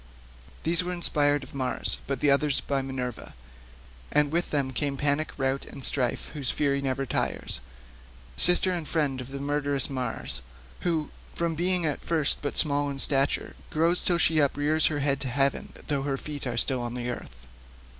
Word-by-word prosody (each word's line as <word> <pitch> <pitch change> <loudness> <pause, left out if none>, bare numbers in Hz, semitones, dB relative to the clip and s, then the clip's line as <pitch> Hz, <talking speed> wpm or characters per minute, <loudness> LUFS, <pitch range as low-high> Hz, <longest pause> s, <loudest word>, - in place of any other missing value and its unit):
These 170 +2 +1
were 180 0 -3
inspired 145 -5 +3
of 130 - -12
Mars, 130 -2 -2
but 140 - -3
the 145 - +4
others 140 0 +3
by 140 -1 -1
Minerva—and 65 - -5
with 170 +2 0
them 135 -3 -1
came 140 +1 -2
Panic, 145 +2 0
Rout, 135 0 -1
and 135 - -8
Strife 125 -4 0
whose 140 -5 -2
fury 140 -1 +1
never 135 0 -1
tires, - - -1 0.8
sister 180 +1 +7
and 170 -4 -2
friend 140 -5 0
of 125 - -9
murderous 140 0 +1
Mars, 125 - -4 0.4
who, 165 -4 -1 0.2
from 170 -1 -1
being 175 +1 0
at 150 -3 -1
first 160 -4 0
but 145 +2 +2
low 145 -1 0
in 140 - -5
stature, 135 0 +3
grows 165 +3 +2
till 175 - +2
she 160 -1 +2
uprears 145 +2 +2
her 145 -2 -2
head 140 -1 +1
to 140 - -4
heaven, 135 +2 0
though 145 -2 -1
her 135 0 -2
feet 145 -1 -6
are 120 -2 -3
still 130 +1 +2
on 120 0 -4
earth. 120 - -6
140 Hz, 170 wpm, -27 LUFS, 130-150 Hz, 0.8 s, sister